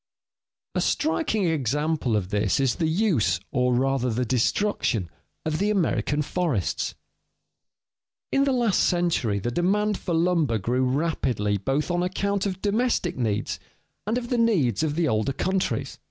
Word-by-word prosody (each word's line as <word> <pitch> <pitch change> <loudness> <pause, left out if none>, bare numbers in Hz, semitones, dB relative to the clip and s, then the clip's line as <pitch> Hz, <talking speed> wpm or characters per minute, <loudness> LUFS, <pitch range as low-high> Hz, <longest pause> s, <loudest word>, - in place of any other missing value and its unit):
_ - - +3
A - - +1
striking 295 - 0
example 150 -3 0
of 95 -3 -3
this 105 +2 +1
is 135 -3 +2
the 160 - +1
use, 160 - +2
or 125 -1 +2
rather 130 0 +1
the 125 +2 -1
destruction, 120 - 0 0.3
of 155 0 -1
the 205 +2 +1
American 160 -6 +1
forests. 155 - -1 1.4
In 275 - +3
the 275 - +2
last 240 -6 +2
century 170 - +1
the 105 +5 -2
demand 205 - +1
for 170 - -2
lumber 165 -8 +2
grew 120 +6 0
rapidly 125 -8 0
both 135 - -1
on 175 0 +1
account 200 +2 -1
of 190 -1 -5
domestic 210 -4 +1
needs 110 -4 -1 0.5
and 225 +3 +1
of 240 -1 -4
the 245 - +2
needs 175 - +2
of 155 -2 0
the 165 -1 +1
older 110 +1 0
countries. 190 +6 -1
155 Hz, 155 wpm, -25 LUFS, 120-195 Hz, 1.4 s, _